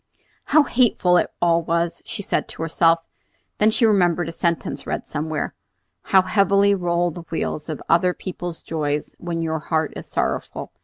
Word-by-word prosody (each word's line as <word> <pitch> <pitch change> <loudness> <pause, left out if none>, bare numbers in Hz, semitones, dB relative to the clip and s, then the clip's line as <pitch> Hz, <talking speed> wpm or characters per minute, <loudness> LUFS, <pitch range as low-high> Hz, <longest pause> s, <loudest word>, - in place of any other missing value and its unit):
"How 310 0 +5
hateful 235 -9 +3
it - - +1
all 170 -1 +4
was!" 170 +1 -1
she 215 -3 -4
said - - -1
to - - -6
herself. 165 0 +3 0.6
Then 215 - +5
she 230 +2 +2
remembered 175 -5 +2
a - - -4
sentence 170 0 -2
read - - -3
somewhere, 155 0 -3 0.5
"How 190 -1 +5
heavily 200 +1 +3
roll 175 -2 0
the 175 - -8
wheels 160 -1 -3
of 155 - -5
other 180 +2 +3
people's 175 -2 -6
joys 150 -2 -2
when 170 -1 -3
your 160 -1 -1
heart 160 0 -1
is - - -8
sorrowful!" - - -3
170 Hz, 165 wpm, -22 LUFS, 165-185 Hz, 0.6 s, How